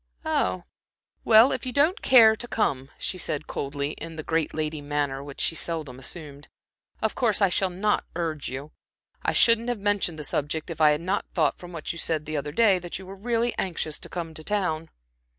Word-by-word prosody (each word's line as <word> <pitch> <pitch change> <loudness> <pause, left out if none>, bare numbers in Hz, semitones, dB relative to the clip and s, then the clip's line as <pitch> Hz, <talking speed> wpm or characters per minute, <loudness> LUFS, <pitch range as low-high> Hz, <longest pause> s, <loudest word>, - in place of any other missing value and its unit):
"Oh, 90 -1 0 0.6
well, 225 +4 +7
if - - -2
you 255 - -3
don't 300 - +2
care 225 -4 +7
to 240 - -7
come," 135 - -1
she 185 - -2
said, 155 -2 -1
coldly, 140 +1 -3
in 165 +1 -8
the 155 - -6
great 160 0 0
lady 155 -1 -3
manner 145 -2 -2
which 140 -1 -10
she - - +1
seldom 155 -6 -3
assumed, 145 0 -7 0.6
"of 220 - +1
course 225 -5 +2
I 195 -2 +4
shall 190 +1 +1
not 195 +4 0
urge 160 -4 -2
you. 140 +4 -6 0.5
I - - 0
shouldn't 230 +1 +5
have 245 - 0
mentioned 200 -5 0
the 150 - -5
subject, 150 +3 -2
if 160 -1 -5
I 155 - +7
had 150 +1 +1
not 185 +3 -1
thought 155 -5 +2
from 175 0 -10
what 165 -2 -4
you 170 - -7
said 155 -2 -1
the 155 0 -4
other 145 0 -2
day, 195 +2 +4
that 175 -1 -5
you 190 - -10
were 190 +1 -9
really 235 +3 0
anxious 165 -4 -2
to - - -9
come 170 -2 -5
to 155 - -7
town." 165 -5 -1
165 Hz, 210 wpm, -26 LUFS, 150-205 Hz, 0.6 s, well